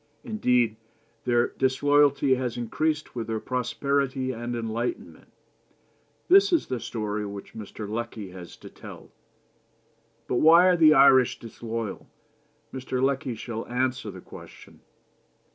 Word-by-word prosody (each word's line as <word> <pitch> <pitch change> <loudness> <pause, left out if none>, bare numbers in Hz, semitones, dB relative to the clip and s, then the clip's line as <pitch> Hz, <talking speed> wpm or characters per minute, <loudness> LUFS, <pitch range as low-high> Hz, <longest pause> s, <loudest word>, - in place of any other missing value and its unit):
Indeed, 125 - +1 0.5
their 120 -1 +2
disloyalty 140 +1 +2
has 125 -2 -2
increased 155 +6 -2
with 115 -2 -5
their 110 -1 -2
prosperity 130 +2 -1
and 120 0 -5
enlightenment. 115 +1 -4 1.0
This 395 +2 +6
is 340 - +2
the 130 -2 -4
story 105 -2 -4
which 100 -1 -8
Mr. 105 -1 -8
Lecky 110 -2 -5
has 90 -2 -11
to - - -12
tell. - - -12 1.2
But 125 - -1
why 165 +5 +7
are 180 - +4
the 155 -2 +6
Irish 130 -2 +5
disloyal? 115 -2 -6 0.7
Mr. 130 -1 -4
Lecky 135 -2 0
shall 115 0 -6
answer 125 +1 -2
the - - -10
question. - - -14
125 Hz, 125 wpm, -26 LUFS, 115-140 Hz, 1.2 s, why